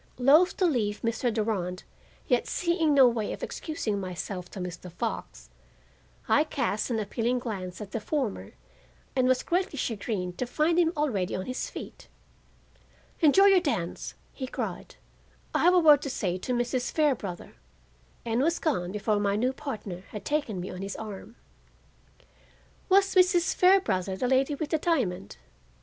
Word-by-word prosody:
Loath 295 +8 +5
to 375 - +2
leave 215 -10 0
Mr. 230 +1 0
Durand, 205 -5 -2 0.4
yet 245 -2 +2
seeing 340 -4 +1
no 265 -2 +8
way 230 -3 -1
of - - -8
excusing 305 -11 -3
myself 180 0 -5
to 195 - -9
Mr. 180 0 -6
Fox, 225 +6 -5 0.8
I 300 - +4
cast 270 -9 -2
an 235 - 0
appealing 230 +4 -1
glance 195 -7 -5
at 205 -1 -8
the 225 - -2
former 255 -1 -3 0.6
and 255 -1 +3
was 255 0 +2
greatly 360 -3 -1
chagrined 200 -7 -3
to 250 - -1
find 320 +6 +1
him 330 -2 +3
already 225 -12 0
on 185 - -4
his 255 - -4
feet. - - -9 1.1
"Enjoy 340 +4 +6
your 390 -2 +7
dance," 230 - -3 0.2
he 260 - -5
cried; - - -5 0.6
"I - - +1
have 360 +1 +6
a - - +7
word 300 -4 +7
to 280 - -4
say 185 -8 -2
to 250 - -4
Mrs. 245 +1 -1
Fairbrother," 250 - -1 0.7
and 230 +1 0
was 330 +4 +2
gone 185 - -1
before 210 +1 0
my 200 -1 +1
new 250 +5 +1
partner 200 -10 -6
had 210 - -8
taken 285 -10 -1
me 180 - -5
on 180 +1 -7
his 195 0 -5
arm. 215 +1 -8 1.5
Was 390 +1 +4
Mrs. 365 -1 +4
Fairbrother 205 - +3
the 250 - 0
lady 265 +3 +2
with 300 +1 -4
the 315 - +2
diamond? 210 - -1
245 Hz, 160 wpm, -28 LUFS, 200-300 Hz, 1.5 s, no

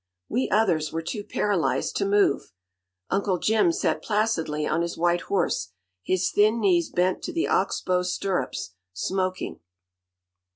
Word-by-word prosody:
We 255 +3 -1
others 170 -8 +2
were 165 0 -3
too 205 +5 -4
paralyzed 200 -4 0
to 200 - 0
move. 200 - +2 0.6
Uncle 195 -1 +1
Jim 220 - +3
sat 365 +4 0
placidly 205 -9 0
on 155 +3 0
his 170 0 -3
white 175 +1 +2
horse, 185 - -1 0.3
his 185 - 0
thin 215 +3 +3
knees 180 -6 +2
bent 180 +1 +1
to - - -4
the 335 -1 0
ox - - +1
bow 180 -1 +1
stirrups, 180 - -2 0.2
smoking. 185 - -2
185 Hz, 140 wpm, -25 LUFS, 170-210 Hz, 0.6 s, Jim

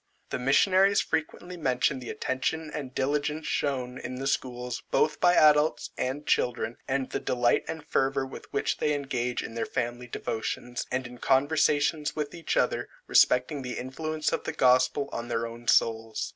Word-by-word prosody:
The - - -2
missionaries 185 +9 +4
frequently 170 +3 -3
mention 130 -3 +1
the 125 - -8
attention 150 +4 -2
and 135 -4 -6
diligence 150 +3 -1
shown 130 -3 -2
in 125 +1 -6
the 135 +2 -5
schools, 125 -2 -2
both 155 - +2
by 175 0 +5
adults, 150 0 +4
and 135 +4 -3
children, 120 -1 0
and 135 -1 -1
the - - -1
delight 120 -1 +1
and 160 -2 -6
fervour 135 -3 +1
with 130 - -11
which - - -1
they 150 -1 +1
engage 125 -3 -2
in - - -7
their 115 - -2
family 120 0 -3
devotions, 120 +1 -4
and 130 +1 -1
in 120 0 -10
conversations 150 +2 +2
with 150 -2 -3
each 170 -2 -2
other - - +1 0.2
respecting 125 +3 +3
the 125 -1 -5
influence 155 +4 -3
of - - -1
the - - -2
gospel 130 +2 +3
on 115 +1 -4
their 115 -1 -1
own 115 +1 -9
souls. 110 -1 +2
130 Hz, 170 wpm, -28 LUFS, 125-150 Hz, 0.2 s, by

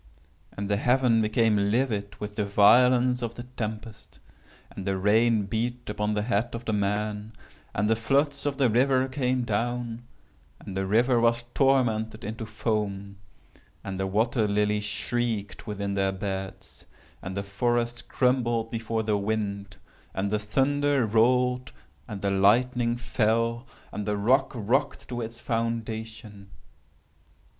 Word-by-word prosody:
And 100 0 -4
the 100 0 +1
heaven 125 -1 +3
became 110 -2 +2
livid 110 -4 -1
with 105 0 -6
the 105 - 0
violence 125 +5 +5
of 115 -1 -4
the 120 - -7
tempest—and 110 - -9
the 95 -1 0
rain 110 +3 +3
beat 120 +3 -3
upon 105 0 -1
the 105 - 0
head 115 +1 -1
of 120 +1 -7
the 110 - -1
man—and 105 0 -3
the 115 - +3
floods 140 +5 0
of 140 -1 -2
the 135 -3 +4
river 130 +3 +3
came 130 -1 0
down—and 120 -2 -5
the 95 0 -1
river 120 +4 +3
was 115 0 +2
tormented 115 -5 +1
into 110 +2 -5
foam—and 100 -3 -5
the 95 - 0
water 110 +3 +1
lilies 105 0 +1
shrieked 110 0 -3
within 100 -1 -3
their 95 -1 +1
beds—and 95 -1 -7
the 100 - -1
forest 120 +4 -1
crumbled 120 -3 +1
before 115 -1 -2
the 105 -1 +1
wind—and 100 -2 -4
the 105 - +1
thunder 140 +4 +1
rolled—and 125 -2 0
the 100 - +1
lightning 120 +5 +3
fell—and 115 -1 -2
the 105 0 0
rock 130 +7 +2
rocked 120 +5 -1
to 120 -1 -3
its 115 +1 -6
foundation. 110 -3 -4
110 Hz, 125 wpm, -26 LUFS, 105-120 Hz, -, violence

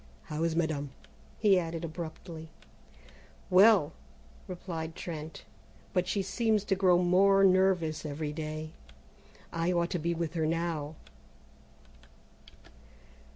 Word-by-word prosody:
How 155 0 -5
is 165 -1 0
madame?" 155 -4 -1 0.5
he 200 -4 +4
added 165 -1 -4
abruptly. 160 0 -7 1.0
"Well," 185 -5 +6 0.5
replied 170 -3 -6
Trent, 160 -2 -7 0.5
"but 180 0 +1
she 200 - 0
seems 215 +1 +1
to 200 -2 0
grow 185 -2 +4
more 195 +2 +5
nervous 185 -4 +3
every 150 0 -4
day. 155 0 -5 0.8
I 165 +2 0
ought 170 -1 0
to 180 - -1
be 170 +2 -1
with 165 -1 -3
her 160 -2 0
now." 160 -2 -2
170 Hz, 110 wpm, -30 LUFS, 160-185 Hz, 1.0 s, Well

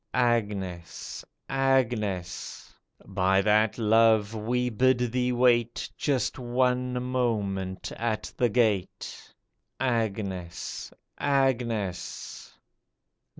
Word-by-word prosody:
Agnes! 105 -8 -1 0.2
Agnes! 120 -9 -1 0.3
By 95 0 +2
that 105 +1 +3
love 110 -1 +4
we 120 +3 0
bid 125 +1 +2
thee 125 0 +1
wait 120 -1 +2
Just 135 -3 0
one 125 0 +1
moment 105 -7 -1
at 110 -2 -2
the 120 - +2
gate! 105 -5 -1 0.5
Agnes! 100 -8 -2 0.3
Agnes 120 -9 -1
115 Hz, 75 wpm, -27 LUFS, 100-125 Hz, 0.5 s, love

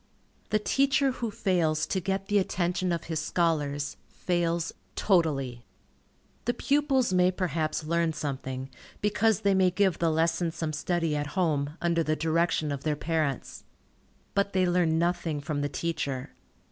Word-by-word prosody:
The 215 - +3
teacher 270 +4 +2
who 240 -2 -3
fails 170 -7 +1
to 190 - -1
get 195 +1 -2
the 205 +1 +3
attention 180 -1 0
of 170 -2 -1
his 160 -2 -2
scholars, 150 -3 0
fails 170 -2 -1 0.2
totally. 140 - +1 0.8
The 240 - 0
pupils 275 -6 +2
may 180 0 +5
perhaps 165 -4 -1
learn 170 +1 +1
something, 135 -3 -4 0.3
because 210 0 +2
they 200 -2 +3
may 190 -1 +4
give 190 0 +1
the 170 - +2
lesson 165 +2 +1
some 160 -2 -3
study 165 0 0
at 145 +4 -4
home, 150 -4 0
under 170 -1 +2
the 155 -1 +1
direction 160 -1 +1
of 140 -1 -3
their 150 0 0
parents. 150 -3 -2 0.7
But 200 0 +1
they 185 -1 +3
learn 175 -2 +2
nothing 170 -2 0
from 145 0 -3
the 145 - -1
teacher. 140 -6 -3
170 Hz, 150 wpm, -28 LUFS, 155-185 Hz, 0.8 s, may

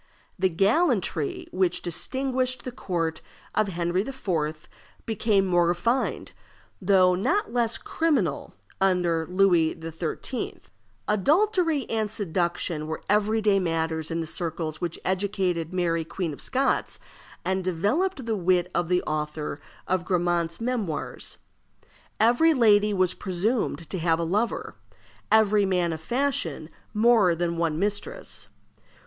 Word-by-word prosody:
The 190 0 +3
gallantry 195 - +1
which 185 -1 0
distinguished 255 +7 -1
the 255 - -5
court 165 -8 -2 0.3
of 215 -1 +2
Henry 175 0 0
IV. 165 - -3 0.4
became 215 -3 +2
more 175 -2 +3
refined, 230 +9 0 0.5
though 185 -1 +5
not 255 - 0
less 235 -2 +1
criminal, 265 - -1 0.3
under 175 -4 +2
Louis 180 -4 +3
XIII. 165 0 -4 0.5
Adultery 320 - +2
and 220 -2 -1
seduction 175 -5 -1
were 160 0 -5
every 210 +2 +2
day 205 -2 +4
matters 160 -2 -1
in 165 0 -1
the - - -3
circles 160 -2 -3
which 170 -1 -2
educated 185 -3 -1
Mary, 170 -2 0
Queen 165 0 -4
of - - -10
Scots, 270 +1 0 0.5
and 190 0 0
developed 230 - 0
the 225 -1 0
wit 180 -1 +1
of 175 - 0
the 180 0 +2
author 150 -1 -3 0.3
of 185 -1 +1
Grammont's 175 -2 0
Memoirs. 225 - -3 0.8
Every 245 +9 +4
lady 210 -4 +5
was 185 -3 +2
presumed 185 - -1
to 190 - -2
have 165 0 +2
a 170 - -1
lover; 210 +8 -1 0.6
every 215 -1 +5
man 180 -3 +1
of 160 - -6
fashion 180 - -1 0.2
more 215 -5 +4
than 170 0 -1
one 165 -2 0
mistress. 205 - -3
185 Hz, 125 wpm, -26 LUFS, 170-220 Hz, 0.8 s, though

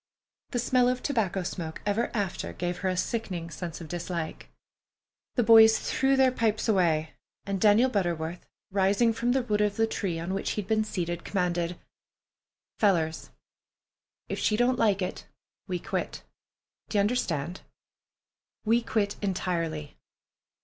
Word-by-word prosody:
The 245 - -2
smell 245 +1 +3
of 250 0 -2
tobacco 200 -9 0
smoke 165 -3 -5
ever 205 +3 +1
after 200 -4 -2
gave 175 0 -3
her 190 - 0
a 185 - -1
sickening 180 -6 -3
sense 165 +1 -6
of 165 - -8
dislike. 170 -1 -5 0.9
The 245 - +3
boys 220 0 +8
threw 270 0 +1
their 265 -1 +5
pipes 225 -3 0
away, 165 -7 +2 0.3
and 195 -2 -2
Daniel 215 +4 +6
Butterworth, 175 -6 -2 0.3
rising 200 +4 +3
from 240 +2 0
the 265 -1 +1
root 210 -3 0
of 205 -1 +1
the 225 - +3
tree 195 -6 -2
on 170 +3 -3
which 195 - -2
he 210 - -2
had - - -18
been 215 0 +2
seated, 175 -4 -3
commanded: 175 -2 -1 1.0
"Fellers, 165 -6 +1 1.0
if - - -3
she 210 - +2
don't 245 +1 +2
like 200 -3 +3
it, 180 - -5 0.4
we 180 - -1
quit! - - -4 0.7
D'ye 210 - +1
understand? 185 - -1 1.0
We 230 +2 +3
quit 210 -3 -1
entirely. 170 -6 -2
195 Hz, 145 wpm, -28 LUFS, 175-225 Hz, 1.0 s, boys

